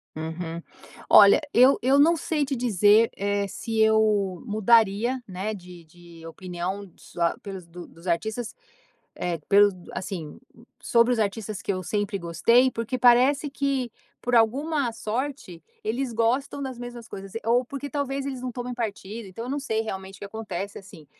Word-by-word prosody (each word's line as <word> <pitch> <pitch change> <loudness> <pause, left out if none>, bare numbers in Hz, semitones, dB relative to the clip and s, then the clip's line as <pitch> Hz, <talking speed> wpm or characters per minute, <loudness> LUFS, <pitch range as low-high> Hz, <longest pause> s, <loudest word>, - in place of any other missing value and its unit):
Uhum. 165 +1 -5 0.5
Olha, 200 -1 +8
eu 255 +3 +6
eu 265 +3 +3
não 325 +4 +5
sei 305 -1 -1
te 275 0 -2
dizer 220 -2 +4
é 200 0 -1
se 225 +3 -4
eu 215 -4 +2
mudaria, 225 +2 +3
né? 195 +2 -4
De 180 -3 -11
de 170 0 -15
opinião 185 +3 -5
só 170 -1 -2
pelos 190 -3 -8
do 170 +1 -11
dos 165 +3 -15
artistas 220 +7 -2 0.6
eh, 175 -1 -2
pelos 205 0 +5 0.2
assim, 175 -5 -6 0.4
sobre 235 +1 +3
os 240 - 0
artistas 210 -1 -2
que - - -4
eu 185 -1 -1
sempre 205 +2 -2
gostei, 195 +10 +3
porque 230 +1 -3
parece 255 +4 +4
que 270 -4 -1 0.3
por 245 0 0
alguma 270 +4 +2
sorte, 225 - -4 0.2
eles 240 +3 -2
gostam 245 +5 0
das 260 -3 -5
mesmas 240 -1 -8
coisas, 195 -1 -9
ou 235 +2 +3
porque 280 +3 -7
talvez 275 -1 -2
eles 270 -2 -4
não 255 0 -4
tomem 245 +1 -5
partido. 220 -2 -5
Então 210 +5 -7
eu 250 - -5
não 285 - -1
sei 220 -5 -1
realmente 195 -3 -6
o - - -18
que - - -6
acontece 200 -2 -6
assim. 185 -6 -14
220 Hz, 165 wpm, -25 LUFS, 190-250 Hz, 0.6 s, Olha